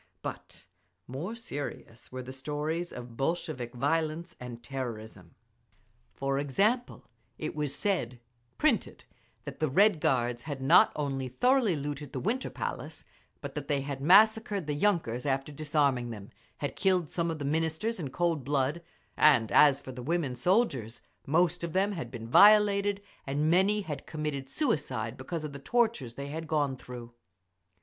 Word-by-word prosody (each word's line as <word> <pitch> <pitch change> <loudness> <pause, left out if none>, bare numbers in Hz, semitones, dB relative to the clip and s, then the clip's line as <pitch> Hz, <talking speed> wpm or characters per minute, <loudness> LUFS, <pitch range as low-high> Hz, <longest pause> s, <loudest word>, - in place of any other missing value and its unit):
But - - -8 0.4
more 155 - -5
serious 145 - -7
were 130 0 -5
the 130 +1 -8
stories 150 +5 -3
of 120 -1 -9
Bolshevik 135 -4 -2
violence 160 +5 -1
and 120 -1 -8
terrorism. 110 -9 -7 0.8
For 135 0 -1
example, 205 - 0 0.3
it 155 - -4
was 150 -2 -2
said 130 - -1 0.4
printed 295 -7 +1 0.4
that - - -7
the 155 - +1
Red 195 +4 +4
Guards 120 -3 +1
had 145 0 -5
not 135 +7 +6
only 135 -3 -2
thoroughly 245 - +2
looted 145 -1 -5
the 130 - -2
Winter 235 - -1
Palace, - - -6 0.4
but - - -6
that 145 -2 -5
they 140 -2 0
had 140 -1 -5
massacred 205 +3 +5
the 150 - -2
yunkers 145 - 0
after 135 +1 -1
disarming 145 -4 0
them, 105 -3 -8 0.3
had 145 - -4
killed 185 -5 +1
some 170 -1 -1
of 160 - -3
the 145 - -5
Ministers 160 +9 -1
in 145 -5 -4
cold 165 -1 0
blood; 140 +4 0 0.3
and 135 -8 +5
as 140 -2 +6
for 130 - -9
the 125 0 -8
woman 145 -2 -1
soldiers, 135 - +1 0.3
most 170 +4 +2
of 170 -2 -3
them 195 +2 +2
had 170 -5 -5
been 115 -3 -7
violated, 205 - +5 0.2
and 145 +3 +1
many 195 +4 +3
had 155 -7 -6
committed 150 -4 -4
suicide 135 - -1
because 155 +5 -5
of 150 -2 -5
the 140 - -7
tortures 220 - 0
they 140 +2 -6
had 160 +2 -5
gone 145 -4 0
through…. 120 -2 -10
150 Hz, 155 wpm, -29 LUFS, 130-175 Hz, 0.8 s, not